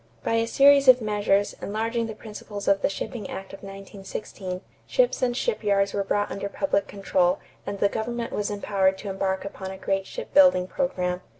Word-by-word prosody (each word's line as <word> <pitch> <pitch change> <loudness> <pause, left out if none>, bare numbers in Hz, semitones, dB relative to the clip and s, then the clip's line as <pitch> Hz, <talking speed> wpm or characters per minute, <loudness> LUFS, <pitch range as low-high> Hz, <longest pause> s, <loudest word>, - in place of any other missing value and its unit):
By - - 0
a 230 0 +1
series 280 +2 +6
of 255 -1 +9
measures, 205 -2 +1
enlarging 225 +2 -1
the 220 - -6
principles 210 -2 -8
of 200 0 +4
the - - +2
shipping 200 +1 -5
act 195 0 -7
of 195 - -8
1916, 195 -1 -7 0.3
ships - - +2
and 245 -1 +1
shipyards 200 - +1
were 200 - 0
brought 205 +1 0
under 200 0 -4
public 200 -2 0
control 190 -2 +1 0.3
and 200 - -3
the 200 - +3
government 230 +3 -3
was 205 - -1
empowered 195 -2 +1
to 200 - -6
embark 190 0 -1
upon 190 -1 -6
a 190 - -7
great 195 0 -1
ship - - -7
building 275 -11 +6
program. 180 -6 -1
200 Hz, 185 wpm, -25 LUFS, 195-230 Hz, 0.3 s, of